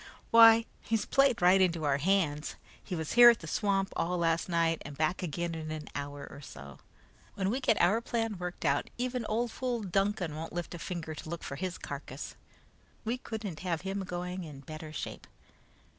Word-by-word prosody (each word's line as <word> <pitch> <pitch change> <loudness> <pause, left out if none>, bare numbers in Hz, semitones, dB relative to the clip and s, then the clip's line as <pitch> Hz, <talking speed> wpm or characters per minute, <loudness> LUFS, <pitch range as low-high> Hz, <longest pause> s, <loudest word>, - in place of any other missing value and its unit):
Why, 230 0 +8 0.2
he's 225 -1 0
played 275 -8 +3
right 185 +2 +6
into 170 -3 +2
our 140 -1 +2
hands. 155 -3 +1 0.3
He 180 - -4
was 160 -2 -3
here 240 0 +10
at 235 - +4
the - - -8
swamp 195 +3 0
all 180 +2 0
last 165 +1 +1
night, 165 -1 +1
and 145 -1 -9
back 160 +4 0
again 170 0 -2
in 160 -1 -5
an 155 -1 -5
hour 145 0 -5
or 140 - -11
so. 70 - -11 0.6
When 190 0 0
we 255 - 0
get 225 -6 +2
our 200 +7 +4
plan 225 -4 -2
worked 180 0 -5
out, 140 +1 +1
even 250 -1 -2
old 230 +2 0
fool 245 -3 -2
Duncan 195 -3 0
won't 160 +1 -6
lift 175 0 -4
a 175 - -6
finger 165 -3 -4
to 155 - -8
look 170 0 -5
for 140 - -5
his 185 +1 -3
carcass. - - -7 0.7
We 240 +3 -1
couldn't 215 -9 -5
have 175 -3 -2
him 195 +1 -3
going 180 0 -4
in 145 -4 -9
better 155 +2 -8
shape." 155 - -6
180 Hz, 195 wpm, -31 LUFS, 160-215 Hz, 0.7 s, here